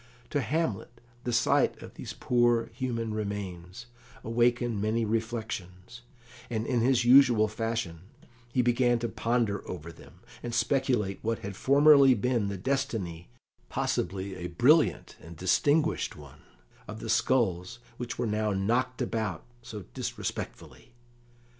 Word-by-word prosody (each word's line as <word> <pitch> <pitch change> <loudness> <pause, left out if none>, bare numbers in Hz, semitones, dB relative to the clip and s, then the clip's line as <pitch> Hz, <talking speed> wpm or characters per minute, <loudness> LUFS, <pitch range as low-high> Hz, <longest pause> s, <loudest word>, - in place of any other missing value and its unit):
To 145 - +1
Hamlet 125 -3 -2 0.3
the 125 - -1
sight 115 - +2
of - - -11
these - - -7
poor 120 -2 +1
human 115 -3 -3
remains 100 -2 -5 0.4
awakened 120 -1 +1
many 110 +2 0
reflections, 110 -2 -4 0.5
and, 110 -2 -2
in 120 -2 +1
his 125 0 +3
usual 120 -4 +6
fashion, 115 -6 -3 0.5
he 125 0 +2
began 120 0 +3
to 120 0 -2
ponder 115 -1 0
over 85 -2 -6
them, - - -17 0.2
and 120 -1 -4
speculate 120 -7 +1
what 115 0 -2
had 100 -1 -5
formerly 140 +1 +6
been 120 -1 0
the 100 -1 -4
destiny 110 - -3 0.4
possibly 95 +2 -2
a 90 - -5
brilliant 120 - +3
and 85 +1 -11
distinguished 145 - +1
one - - -14 0.5
of - - -7
the - - -7
skulls 110 -4 +1 0.2
which 120 -1 -5
were 120 - -1
now 105 -1 0
knocked 120 +6 0
about 110 -7 -3 0.2
so 110 -4 -8
disrespectfully. 120 - -6
115 Hz, 130 wpm, -28 LUFS, 100-125 Hz, 0.5 s, usual